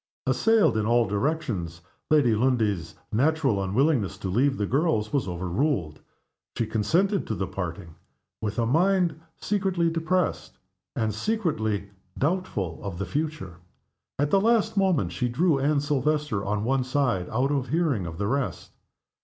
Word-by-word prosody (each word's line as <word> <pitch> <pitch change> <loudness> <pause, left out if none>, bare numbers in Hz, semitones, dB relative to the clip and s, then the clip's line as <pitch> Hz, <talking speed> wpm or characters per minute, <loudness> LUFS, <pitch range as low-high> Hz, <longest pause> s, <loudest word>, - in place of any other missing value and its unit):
Assailed 225 - +3
in 110 0 0
all 120 0 +4
directions, 100 - -2 0.3
Lady 145 -7 +4
Lundie's 110 -7 0 0.2
natural 135 -3 +2
unwillingness 105 - +1
to 95 -2 -4
leave 135 +8 +2
the 105 - 0
girls 130 - 0
was 135 -8 +1
overruled. 90 - -1 0.6
She 115 - +1
consented 170 - +1
to 110 - -2
the 95 - -2
parting 90 -2 -6 0.5
with 105 -1 -3
a 115 - +2
mind 170 +4 +2 0.2
secretly 190 -5 0
depressed, 165 +2 -1 0.4
and 110 -5 0
secretly 110 - -1 0.3
doubtful 140 - -1
of 100 -4 -5
the 100 - -3
future. 150 - -4 0.6
At 145 +1 0
the 195 - +4
last 225 -1 +2
moment 180 - +2
she 120 +9 -1
drew 155 +3 +2
Anne 140 +1 +2
Silvester 145 -5 0
on 105 +1 -1
one 130 +2 +1
side, 125 -8 0
out 130 +5 0
of 140 -3 0
hearing 140 - 0
of 80 -1 -7
the 100 - -1
rest. 135 +5 -2
125 Hz, 145 wpm, -26 LUFS, 100-160 Hz, 0.6 s, all